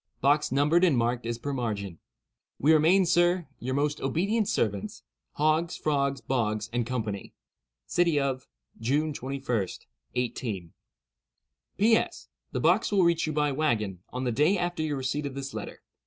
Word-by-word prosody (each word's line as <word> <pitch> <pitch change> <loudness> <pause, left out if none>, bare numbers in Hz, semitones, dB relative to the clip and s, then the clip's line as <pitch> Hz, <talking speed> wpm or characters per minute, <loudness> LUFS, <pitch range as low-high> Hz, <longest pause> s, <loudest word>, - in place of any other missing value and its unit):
Box 145 +1 +2
numbered 150 +6 +3
and 165 -8 +4
marked 120 0 0
as 120 0 -2
per 140 +4 -4
margin. 105 -8 -3 0.6
"We 155 +4 +4
remain, 170 +5 +5
sir, 175 0 +3
"Your 130 +2 -3
most 145 +1 0
ob'nt 195 - +1
ser'ts, 100 -3 -1 0.3
"HOGGS, 155 +3 +1
FROGS, 140 -3 0
BOGS, 110 -4 -1
& 120 - +1
CO. 115 -5 -2 0.7
"City 170 -4 +2
of—, 135 -2 -2 0.3
June 145 +7 0
21, 130 -6 -2 0.5
18—. 115 -8 -3 1.1
"P.S.—The 225 +3 0
box - - +3
will 195 -3 +4
reach 170 -2 +2
you 155 - -2
by 150 -1 +1
wagon, 115 - 0
on 125 +1 -4
the 125 - 0
day 150 - +3
after 175 -2 -2
your 150 -2 -1
receipt 140 +3 -2
of 135 - -7
this 135 0 -5
letter. - - -7
140 Hz, 150 wpm, -28 LUFS, 120-155 Hz, 1.1 s, remain